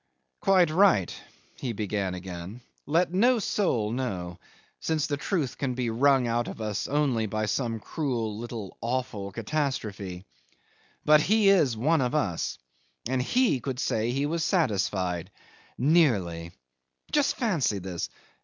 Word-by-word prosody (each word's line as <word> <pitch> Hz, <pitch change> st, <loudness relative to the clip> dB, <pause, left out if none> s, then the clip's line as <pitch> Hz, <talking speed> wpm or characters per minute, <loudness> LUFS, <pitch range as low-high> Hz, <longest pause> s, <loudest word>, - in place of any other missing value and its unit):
'Quite 185 Hz, -5 st, +4 dB
right,' 170 Hz, -, +4 dB, 0.5 s
he 125 Hz, -3 st, -3 dB
began 100 Hz, -3 st, -2 dB
again. 90 Hz, +5 st, -7 dB, 0.3 s
'Let 170 Hz, +4 st, +2 dB
no 240 Hz, +7 st, +4 dB
soul 150 Hz, -, 0 dB
know, 95 Hz, -9 st, -3 dB, 0.4 s
since 155 Hz, -2 st, 0 dB
the 145 Hz, -, -1 dB
truth 145 Hz, -, -2 dB
can 130 Hz, -3 st, -1 dB
be 120 Hz, -2 st, -1 dB
wrung 135 Hz, +2 st, +4 dB
out 120 Hz, 0 st, 0 dB
of -, -, -7 dB
us 105 Hz, -2 st, -2 dB
only 135 Hz, -6 st, +1 dB
by 110 Hz, +1 st, -1 dB
some 115 Hz, +1 st, -1 dB
cruel, 115 Hz, -5 st, -2 dB
little, 115 Hz, -3 st, -7 dB
awful 115 Hz, -4 st, -3 dB
catastrophe. 105 Hz, -7 st, -3 dB, 0.8 s
But 150 Hz, 0 st, +6 dB
he 210 Hz, +3 st, +4 dB
is 150 Hz, -, +4 dB
one 150 Hz, +6 st, +2 dB
of 125 Hz, +2 st, 0 dB
us, 100 Hz, -, -1 dB, 0.5 s
and 130 Hz, +1 st, 0 dB
he 245 Hz, -, +2 dB
could 130 Hz, +1 st, -4 dB
say 110 Hz, -4 st, 0 dB
he 135 Hz, +3 st, 0 dB
was 165 Hz, +2 st, -1 dB
satisfied... 95 Hz, -, 0 dB, 0.5 s
nearly. 105 Hz, -, +2 dB, 0.6 s
Just 295 Hz, -2 st, +2 dB
fancy 170 Hz, -, +1 dB
this! 90 Hz, -2 st, -4 dB
125 Hz, 135 wpm, -27 LUFS, 105-155 Hz, 0.8 s, But